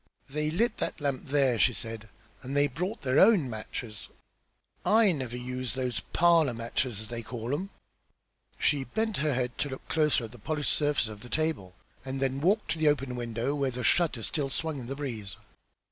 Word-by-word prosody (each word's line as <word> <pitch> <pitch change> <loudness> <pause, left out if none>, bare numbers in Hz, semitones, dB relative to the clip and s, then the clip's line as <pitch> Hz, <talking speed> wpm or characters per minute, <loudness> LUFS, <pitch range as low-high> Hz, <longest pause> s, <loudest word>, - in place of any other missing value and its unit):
"They 150 +1 0
lit 220 +8 +1
that - - -2
lamp 140 -3 -1
there!" 135 -4 +2
she 125 - +5
said. 110 +1 -4 0.3
"And 135 +2 -3
they 145 - +5
brought 180 - -3
their 130 +1 +3
own 190 - +6
matches. 110 -1 -5 0.7
I 220 -2 +5
never 130 -6 -3
use 125 0 -4
those 125 -2 -1
'parlour 165 -7 +3
matches,' 115 -1 -1
as 110 - -7
they 120 -1 -4
call 120 +2 -4
'em!" 185 +7 -2 0.9
She 145 -2 +2
bent 220 - -1
her 150 -2 +1
head 125 -1 -1
to 145 - 0
look 130 - -8
closer 150 -5 +3
at 110 - -7
the 120 - -13
polished 150 +6 0
surface 145 -5 +2
of 105 -1 -8
the 125 - -11
table, 155 - -1 0.3
and 135 +1 -4
then 135 0 0
walked 200 +7 +2
to 165 - -2
the 155 - +3
open 135 -4 0
window, 120 +2 -2
where 140 -2 0
the 125 0 -4
shutter 150 -9 +2
still 140 +2 0
swung 155 +1 -2
in 120 - -7
the 135 - -4
breeze. 115 -9 -4
135 Hz, 195 wpm, -29 LUFS, 120-150 Hz, 0.9 s, own